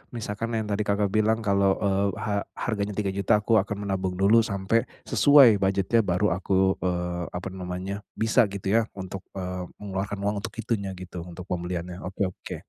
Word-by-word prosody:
misalkan 115 +1 -3
yang 110 - 0
tadi, 105 -1 -2
Kakak 100 -1 +1
bilang 110 +1 +2
kalau, 100 -1 +3
eee, 100 0 +1
ha 100 -2 -1 0.2
harganya 105 -3 -2
Rp3.000.000, 100 +1 +1
aku 110 0 +4
akan 100 +1 -3
menabung 95 -2 -2
dulu 100 +5 +5
sampai 110 +1 0 0.2
sesuai 135 -8 +6
budgetnya 100 +3 +2
baru 90 +2 +2
aku, 95 0 +2
eee, 90 -1 -2
apa 90 +1 -4
namanya, 95 +2 -5 0.2
bisa 110 0 +3
gitu 100 +2 +1
ya 110 - -1
untuk, 95 0 -7
eee, 90 -1 -4
mengeluarkan 100 0 -4
uang 105 +1 0
untuk - - -7
itunya 105 -4 -2
gitu, 90 -1 -8
untuk 85 +1 -8
pembeliannya. 90 0 -3
Oke 95 +2 -3
oke. - - -8
100 Hz, 170 wpm, -26 LUFS, 95-105 Hz, 0.2 s, sesuai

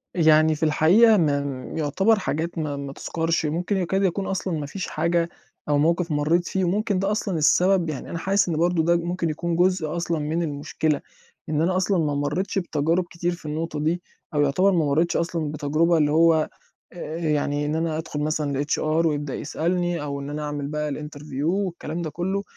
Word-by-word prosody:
يعني 155 -2 +5
في 155 - -5
الحقيقة 190 +9 +5
ما 145 -4 +2
م 140 0 -5
يُعتبَر 195 +9 +2
حاجات 170 -1 -3
ما 150 -3 -2
ما 140 -1 -6
تُذكَرش، 165 +1 -1
ممكن 175 +6 -1
يكاد 190 +2 0
يكون 190 +1 0
أصلًا 190 -1 -2
ما 145 - -4
فيش 180 +6 -5
حاجة 170 +1 0 0.4
أو 145 - +3
موقِف 165 +3 +1
مرّيت 155 +4 +1
فيه، 190 - -1
وممكن 200 +1 0
ده 195 +2 0
أصلًا 200 -5 -1
السبب 180 +3 +3
يعني 145 -4 -5
أنا 170 - -4
حاسس 195 +1 +1
إن 160 - 0
برضه 170 0 +2
ده 170 +1 +3
ممكن 170 0 -2
يكون 165 +2 -2
جزء 175 -3 +1
أصلًا 170 -1 -1
من 160 +3 -1
المشكلة، 150 0 -1 0.5
إن 155 0 +1
أنا 180 +2 +1
أصلًا 190 +1 +1
ما 145 - -1
مرّيتش 150 +8 -1
بتجارُب 165 0 0
كتير 175 0 -2
في 170 -2 -9
النقطة 155 0 -3
دي 165 +4 0 0.3
أو 145 - +2
يُعتبَر 165 +8 +3
ما 170 -4 +2
مرّيتش 155 +4 +1
أصلًا 165 -3 -2
بتجربة 155 +3 +1
اللي 150 -2 +2
هو 160 0 +4 0.4
آآ 165 -2 -6
يعني 150 -2 0
إن 150 +1 -1
أنا 160 -1 -1
أدخُل 155 -2 -5
مثلًا 150 -2 -1
لHR 145 - -1 0.3
ويبدأ 145 -3 -1
يسألني 175 +2 -1
أو 140 -1 -4
إن 140 0 -6
أنا 150 +1 -4
أعمل 145 -1 -3
بقى 150 0 -2
الInterview 145 -1 -6
والكلام 175 -2 -2
ده 160 - -3
كلّه 190 +5 -2
160 Hz, 195 wpm, -24 LUFS, 150-175 Hz, 0.5 s, يعني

